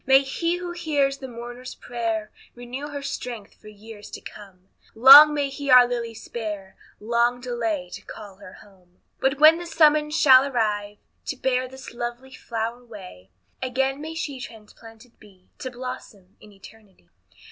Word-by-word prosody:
May 265 Hz, 0 st, +6 dB
he 335 Hz, +5 st, -2 dB
who 355 Hz, 0 st, -6 dB
hears 290 Hz, -5 st, -1 dB
the 265 Hz, -, -7 dB
mourner's 245 Hz, +1 st, -9 dB
prayer, 225 Hz, -3 st, -4 dB, 0.2 s
Renew 245 Hz, +4 st, -7 dB
her 285 Hz, -1 st, -7 dB
strength 245 Hz, -6 st, -6 dB
for -, -, -15 dB
years 210 Hz, 0 st, -12 dB
to -, -, -8 dB
come; 190 Hz, -3 st, -14 dB, 0.3 s
Long 275 Hz, +6 st, +10 dB
may 290 Hz, -1 st, -1 dB
He 280 Hz, +1 st, -6 dB
our 250 Hz, -1 st, +8 dB
Lilly 235 Hz, -2 st, -4 dB
spare, 210 Hz, -4 st, -7 dB, 0.2 s
Long 235 Hz, +3 st, 0 dB
delay 230 Hz, -7 st, -3 dB
to -, -, -8 dB
call 200 Hz, -3 st, -11 dB
her 200 Hz, -2 st, -13 dB
home. 185 Hz, -3 st, -24 dB, 0.2 s
But 265 Hz, +1 st, 0 dB
when 315 Hz, +2 st, +7 dB
the 345 Hz, -, -7 dB
summons 305 Hz, -1 st, +3 dB
shall 265 Hz, -3 st, +7 dB
arrive 210 Hz, -6 st, -2 dB, 0.3 s
To 275 Hz, -, -4 dB
bear 255 Hz, 0 st, -1 dB
this 260 Hz, -1 st, -12 dB
lovely 240 Hz, +2 st, -6 dB
flower 230 Hz, 0 st, -5 dB
away, 190 Hz, -, -13 dB, 0.3 s
Again 265 Hz, +2 st, -1 dB
may 320 Hz, +1 st, -7 dB
she 290 Hz, -5 st, -5 dB
transplanted 225 Hz, +1 st, -14 dB
be 190 Hz, -3 st, -21 dB
To 260 Hz, -, -5 dB
blossom 240 Hz, -6 st, -9 dB
in 210 Hz, -, -16 dB
eternity. 200 Hz, -, -18 dB
240 Hz, 160 wpm, -23 LUFS, 215-270 Hz, 0.3 s, Long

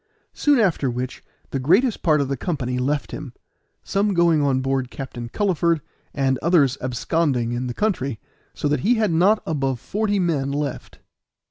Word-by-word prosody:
Soon 290 Hz, -1 st, +3 dB
after 180 Hz, -, +2 dB
which 125 Hz, +1 st, -4 dB, 0.3 s
the 135 Hz, -, -1 dB
greatest 195 Hz, -, +3 dB
part 155 Hz, -4 st, +3 dB
of 140 Hz, -, -1 dB
the 140 Hz, -, -1 dB
company 125 Hz, -3 st, -2 dB
left 145 Hz, +3 st, -1 dB
him, 145 Hz, -5 st, -7 dB, 0.5 s
some 200 Hz, 0 st, 0 dB
going 170 Hz, -3 st, +4 dB
on 135 Hz, -2 st, +2 dB
board 135 Hz, -1 st, -1 dB
Captain 120 Hz, -4 st, -7 dB
Culliford, 170 Hz, -, +1 dB, 0.3 s
and 135 Hz, -2 st, 0 dB
others 145 Hz, -5 st, +3 dB
absconding 130 Hz, -1 st, 0 dB
in 120 Hz, +1 st, -2 dB
the 120 Hz, -, -5 dB
country, 140 Hz, -, -1 dB, 0.4 s
so -, -, -1 dB
that 145 Hz, +1 st, +1 dB
he 235 Hz, +5 st, +3 dB
had 215 Hz, -4 st, +1 dB
not 190 Hz, +7 st, +3 dB
above 135 Hz, -5 st, -1 dB
forty 205 Hz, -, -1 dB
men 155 Hz, -7 st, 0 dB
left. 145 Hz, 0 st, -4 dB
145 Hz, 165 wpm, -22 LUFS, 130-175 Hz, 0.5 s, going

